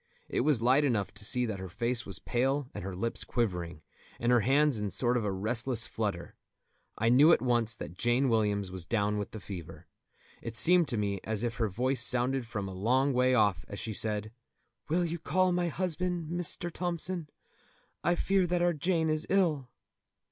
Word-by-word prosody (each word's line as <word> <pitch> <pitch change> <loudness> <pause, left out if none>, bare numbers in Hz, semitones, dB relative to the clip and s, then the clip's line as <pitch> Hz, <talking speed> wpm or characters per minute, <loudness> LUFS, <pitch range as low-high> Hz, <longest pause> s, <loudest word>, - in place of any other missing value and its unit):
It - - -2
was 135 -4 +2
light 130 +4 +4
enough 115 -8 0
to - - -7
see 125 +3 +4
that 105 -4 -4
her 95 -1 -7
face 120 +5 -2
was 95 - -5
pale 135 +2 -1
and - - -7
her 95 -1 -5
lips 115 +6 -1
quivering, 90 -9 -3 0.4
and 120 +1 +1
her 120 - +5
hands 135 +1 +2
in 105 - -2
a - - -3
sort 120 +5 +1
of 120 -3 0
restless 115 +4 -1
flutter. 100 -6 -4 0.6
I 115 +1 +1
knew 140 +7 +6
at - - +4
once 120 -2 +1
that 90 -4 -9
Jane 120 +3 +2
Williams 105 -4 0
was 95 -2 -6
down 105 +2 -1
with 105 - -4
the 110 - -8
fever. 95 -5 -9 0.6
It 115 - -6
seemed 175 +5 +5
to 120 - -2
me 100 -2 -1
as 110 0 -2
if 120 0 -3
her 115 -3 0
voice 125 +6 0
sounded 125 +1 +2
from 100 -3 -4
a 95 - -7
long 130 +8 +1
way 125 +1 +3
off 105 -8 +2
as 100 - -8
she 110 - -4
said: 105 0 0 0.6
"Will 175 +3 +1
you 170 0 -4
call 185 +4 +1
my 175 0 0
husband, 175 -1 -2
Mr. 175 0 +2
Thompson? 170 -2 -2 0.7
I 175 - +2
fear 190 0 +1
that 175 0 0
our 175 0 +2
Jane 165 +1 0
is 155 0 0
ill." 160 -10 +1
120 Hz, 200 wpm, -30 LUFS, 105-155 Hz, 0.7 s, knew